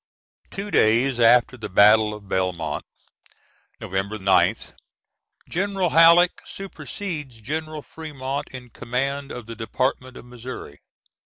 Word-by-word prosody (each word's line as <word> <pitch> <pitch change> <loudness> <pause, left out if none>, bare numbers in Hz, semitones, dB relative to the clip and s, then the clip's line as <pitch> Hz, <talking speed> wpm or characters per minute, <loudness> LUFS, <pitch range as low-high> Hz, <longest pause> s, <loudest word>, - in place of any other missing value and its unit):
[Two 200 +1 -6
days 120 +4 +3
after 120 +2 +5
the 110 -3 -7
battle 105 +3 +5
of 105 -2 -13
Belmont, 90 -5 -2 1.0
November 95 +3 -3
9th, 95 -1 +2 0.7
General 190 -1 -1
Halleck 170 +2 +6
supersedes 170 - -7
General 155 +5 -5
Fremont 140 -3 -6
in 125 -2 -11
command 135 +4 -3
of 120 -2 -7
the 115 0 -8
Department 130 +3 -2
of - - -12
Missouri. 120 - -9
125 Hz, 110 wpm, -23 LUFS, 110-155 Hz, 1.0 s, Halleck